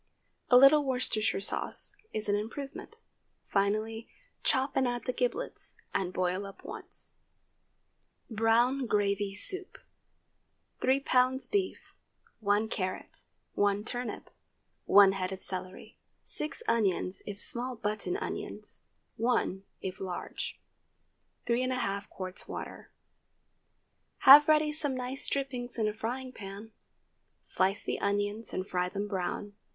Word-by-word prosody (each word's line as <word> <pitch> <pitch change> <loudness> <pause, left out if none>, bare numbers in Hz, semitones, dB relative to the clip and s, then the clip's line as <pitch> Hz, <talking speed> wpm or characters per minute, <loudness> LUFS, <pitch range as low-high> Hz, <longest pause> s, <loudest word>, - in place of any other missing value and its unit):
A 250 - +8
little 275 +3 +8
Worcestershire 250 -6 0
sauce 200 - -1 0.2
is 215 0 -3
an 205 - +3
improvement. 275 - -6 0.5
Finally, 215 +3 0 0.3
chop 265 +1 +1
and 265 -1 +3
add 245 0 -2
the 250 - -2
giblets, 260 - -3 0.2
and 180 -2 0
boil 185 +2 -1
up 195 - -13
once. - - -8 1.1
BROWN 235 +3 +2
GRAVY 200 -2 +1
SOUP. 370 - -1 1.0
3 265 +2 +3
lbs. 260 0 +2
beef. 395 -2 -2 0.4
1 205 0 +2
carrot. 185 -3 -4 0.3
1 205 0 +2
turnip. 245 +2 -4 0.5
1 200 -1 +8
head 185 -1 -3
of 190 - -5
celery. 185 0 -3 0.2
6 305 +9 -3
onions, 195 -4 +1
if 205 -1 -6
small 245 +3 +2
button 215 - -2
onions—one, 230 - -3 0.2
if 190 -1 -5
large. 185 -2 -5 0.9
3½ 240 -5 0
qts. 185 -1 -5
water. - - -7 1.3
Have 290 +2 +10
ready 305 -1 +4
some 295 -3 -1
nice 255 +1 -2
dripping 260 -3 -2
in 220 -2 +1
a 210 - -1
frying 250 +4 -4
pan. 205 0 -9 0.7
Slice 190 +2 0
the - - -2
onions 205 +2 -1
and 185 +1 -3
fry 180 0 0
them 200 +2 -3
brown. 200 +1 -3
220 Hz, 115 wpm, -30 LUFS, 200-255 Hz, 1.3 s, Have